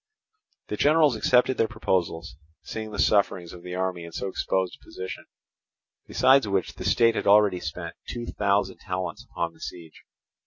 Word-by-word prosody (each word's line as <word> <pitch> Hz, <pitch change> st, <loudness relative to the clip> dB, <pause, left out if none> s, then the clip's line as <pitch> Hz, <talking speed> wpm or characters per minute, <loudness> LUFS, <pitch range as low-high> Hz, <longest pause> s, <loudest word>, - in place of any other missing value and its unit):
The -, -, -3 dB
generals 150 Hz, -3 st, +4 dB
accepted 125 Hz, +3 st, +3 dB
their 115 Hz, -, +3 dB
proposals, 85 Hz, -6 st, -2 dB, 0.3 s
seeing 110 Hz, -1 st, -6 dB
the 105 Hz, -, -7 dB
sufferings 95 Hz, -4 st, +2 dB
of 90 Hz, -, -11 dB
the 90 Hz, 0 st, -6 dB
army 90 Hz, -2 st, -2 dB
in 85 Hz, -, -9 dB
so 80 Hz, -, -4 dB
exposed 95 Hz, -1 st, -1 dB
a -, -, -24 dB
position; 95 Hz, 0 st, -7 dB, 0.8 s
besides 135 Hz, -3 st, +4 dB
which 100 Hz, -2 st, -1 dB
the -, -, -8 dB
state 115 Hz, -1 st, +4 dB
had -, -, -2 dB
already 100 Hz, -2 st, +5 dB
spent 80 Hz, -, -6 dB
two 120 Hz, -1 st, -5 dB
thousand 100 Hz, -4 st, 0 dB
talents 90 Hz, -2 st, -4 dB
upon 85 Hz, -1 st, -3 dB
the 80 Hz, -, -22 dB
siege. 85 Hz, -3 st, -9 dB
95 Hz, 165 wpm, -26 LUFS, 90-110 Hz, 0.8 s, already